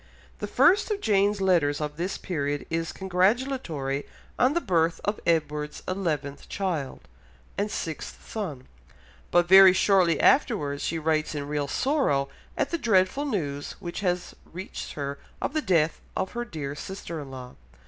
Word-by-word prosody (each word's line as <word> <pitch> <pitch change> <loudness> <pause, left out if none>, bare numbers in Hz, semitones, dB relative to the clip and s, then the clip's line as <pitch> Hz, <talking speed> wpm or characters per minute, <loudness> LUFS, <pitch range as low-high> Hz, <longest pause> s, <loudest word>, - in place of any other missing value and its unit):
The - - -3
first 390 +5 +4
of 420 -2 -1
Jane's 205 - +2
letters 165 -7 +3
of 150 -1 -3
this 175 +4 -3
period 145 -5 -2
is 165 0 -1
congratulatory 185 - 0 0.3
on 255 +3 +4
the - - +4
birth 165 - +1
of 205 +1 -1
Edward's 150 -2 0
eleventh 155 -7 -3
child, 170 -9 -3 0.5
and 205 +1 -1
sixth 160 -6 -5
son, 155 - -5 0.6
but 175 0 +3
very 190 0 +9
shortly 185 -4 +3
afterwards 150 - +3
she 165 - -1
writes 155 -1 0
in 145 -1 -3
real 145 -1 -1
sorrow 145 - +1 0.3
at - - 0
the 335 - -1
dreadful 220 +3 +2
news 145 - -3
which 175 -1 -6
has 180 -2 -1 0.2
reached 185 +4 -7
her 140 -1 -4 0.2
of - - -2
the 310 - +1
death 165 - +2 0.2
of 190 - -1
her 240 0 -3
dear 150 -9 -5
sister 170 +1 -6
in 140 -2 -8
law. 130 -1 -9
170 Hz, 155 wpm, -26 LUFS, 150-200 Hz, 0.6 s, very